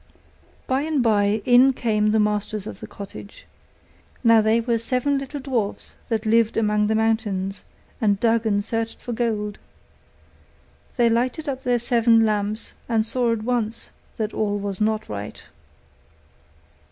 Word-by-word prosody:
By 260 +1 0
and 300 -4 0
by 210 -1 +2
in 255 +1 +6
came 215 -4 +1
the 220 +1 +2
masters 210 -1 -1
of 195 - -8
the - - -8
cottage. 200 0 -10 0.8
Now 230 -2 +6
they 220 +2 +3
were 230 0 0
seven 255 +4 0
little 275 +2 -6
dwarfs, 245 -7 -3 0.2
that 225 -1 -1
lived 225 0 +2
among 210 -1 +2
the 220 - +1
mountains, 210 -3 0 0.4
and 205 -3 +2
dug 230 0 +2
and 205 -1 +1
searched 225 0 -3
for 245 - -5
gold. 215 -3 -2 1.4
They 240 -1 +4
lighted 245 +7 0
up 265 -2 -3
their 245 -2 +1
seven 230 -1 +3
lamps, 210 +1 -2 0.2
and 220 -2 +2
saw 240 0 0
at 225 -2 -2
once 230 -2 -2 0.3
that 220 -1 -2
all 205 -1 -1
was 200 -1 -3
not 215 0 0
right. 105 0 -7
225 Hz, 150 wpm, -23 LUFS, 210-240 Hz, 1.4 s, in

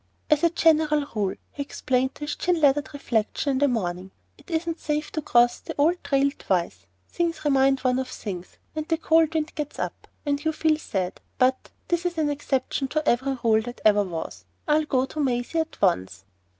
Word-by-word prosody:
"As 305 +2 +4
a 335 - +6
general 310 -3 +3
rule," 205 -4 -1 0.2
he 285 - -6
explained 260 -2 -1
to - - -17
his 295 - -2
chin 355 -1 +1
lathered 285 -2 +3
reflection 275 -1 -1
in 265 - 0
the 285 - +4
morning, 185 -6 -2 0.3
"it - - -20
isn't 330 0 -2
safe 300 0 -2
to 310 - -2
cross 240 -4 +3
an - - -4
old 330 +5 +2
trail 275 0 +2
twice. 180 -3 -1 0.2
Things 335 -3 -2
remind 270 -1 +3
one 255 0 +2
of 260 - -2
things, 185 -8 -7 0.2
and 310 +1 -4
a 325 - +3
cold 320 0 +3
wind 310 -1 -1
gets 300 -1 -5
up, - - -5 0.2
and 285 0 0
you 315 0 +1
feel 310 0 +2
sad; 185 -10 -3 0.2
but 255 0 +2 0.2
this 345 0 +1
is 345 -1 -5
an 300 -2 +1
exception 270 -1 -1
to 310 +2 -2
every 265 +2 +2
rule 220 -1 +4
that 245 +2 -8
ever 210 -1 +6
was. 160 - -5 0.2
I'll 305 +1 +3
go 260 -3 +1
to 305 - -8
Maisie 255 +3 0
at 320 0 -3
once." 95 - +1
280 Hz, 200 wpm, -25 LUFS, 240-310 Hz, 0.3 s, a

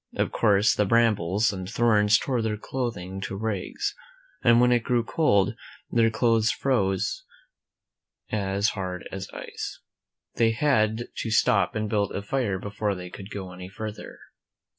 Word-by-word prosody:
Of - - 0
course, 105 0 +3
the 105 - +1
brambles 105 -3 +2
and 95 -1 -6
thorns 110 -2 +4
tore 125 -1 -1
their 110 -1 -1
clothing 100 -6 -4
to 95 - -4
rags, 110 - -3 0.5
and 120 -1 +6
when 125 0 +5
it 120 -1 +3
grew 120 0 +1
cold, 100 - +2 0.4
their 115 -1 +4
clothes 110 -1 +2
froze 125 - 0 1.1
as 100 0 +1
hard 90 -3 -5
as 95 0 -6
ice. - - -7 0.5
Then 115 - +2
they - - +3
had 110 -4 +2
to 115 - -3
stop 100 -3 +3
and 105 0 -1
build 105 -2 0
a 100 - -3
fire 105 -3 -1
before 100 +1 -2
they 90 -1 -8
could 100 0 -9
go 95 -3 -6
any 90 0 -9
further. 105 +2 -7
105 Hz, 155 wpm, -26 LUFS, 95-115 Hz, 1.1 s, and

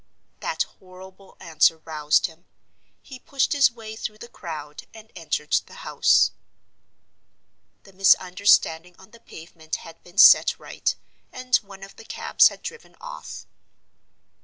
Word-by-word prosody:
That - - -2 0.2
horrible 190 +1 -16
answer 160 0 +2
roused 155 -2 0
him. 165 0 -10 0.6
He 260 -2 -12
pushed 275 +2 -1
his 280 -3 +4
way 220 -2 -10
through 215 -1 -6
the 235 - -11
crowd 155 -8 -9
and 220 0 -15
entered 155 -3 -4 0.2
the - - -15
house. - - +3 1.5
The 195 - -19
misunderstanding 180 -2 +2
on 190 +2 -18
the 235 - -17
pavement 160 -6 -9
had 165 0 -12
been 175 +2 -19
set - - +7
right, - - -3 0.4
and 255 0 -1
one 195 -2 -14
of 195 - -13
the 225 - -14
cabs - - +3
had - - -8
driven 470 - -10
off. - - -10
190 Hz, 135 wpm, -23 LUFS, 165-220 Hz, 1.5 s, set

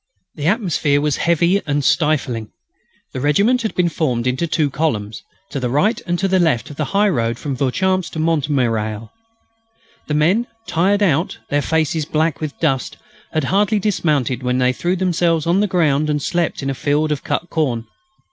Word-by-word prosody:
The 150 0 -3
atmosphere 170 - +1
was 150 -1 0
heavy 170 +3 +2
and 145 -1 0
stifling. 135 -8 +1 0.6
The - - -4
regiment 200 - +3
had 220 - -3
been 180 -1 +2
formed 130 -8 -1
into 130 +7 0
two 155 -3 0
columns, 115 -8 -2 0.3
to 140 - -3
the 125 -2 -2
right 170 - +1
and 175 0 0
the 190 0 +1
left 155 -7 +1
of - - -9
the 150 - -1
high 200 +7 +2
road 115 - 0
from 140 0 -4
Vauchamps 185 +8 0
to 160 - -4
Montmirail. 125 -9 0 1.0
The 150 - -2
men, 185 +11 +2 0.2
tired 200 +4 +1
out, 165 -1 +1
their 145 0 +2
faces 160 0 0
black 155 0 0
with 155 -2 -5
dust, 135 -6 -1 0.3
had 155 - 0
hardly 205 +7 +2
dismounted 150 - 0
when 125 0 0
they 125 0 +2
threw 175 +8 -1
themselves 175 -3 +1
on 175 +3 +2
the 210 - +2
ground 155 -5 +1
and 150 0 +1
slept 170 0 -1
in 135 - -1
a - - -2
field 150 +3 0
of 145 - -2
cut 160 +3 -3
corn. 125 -8 -1
155 Hz, 180 wpm, -19 LUFS, 135-175 Hz, 1.0 s, regiment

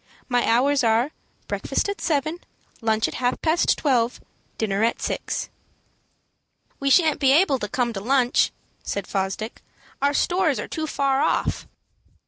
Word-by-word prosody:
My 245 -1 +1
hours 265 +4 +3
are, 230 +5 +2 0.4
breakfast - - -1
at 405 0 -4
seven, 310 +1 0 0.4
lunch 220 -1 +1
at - - -6
half 250 0 -1
past 330 +1 +2
twelve, 245 -5 +1
and - - -32
dinner 205 -1 0
at 230 - +1
six." - - -3 1.3
"We 275 - 0
shan't 315 +1 +4
be 270 -2 +4
able 290 -3 +4
to 210 - -3
come 240 +1 -1
to 195 - -5
lunch," 250 +2 +2 0.3
said 200 - -4
Fosdick. 195 +3 -3 0.4
"Our 285 +1 +2
stores 350 -5 +1
are - - -4
too 315 -1 -4
far 275 -2 +1
off." - - 0
265 Hz, 150 wpm, -23 LUFS, 230-295 Hz, 1.3 s, shan't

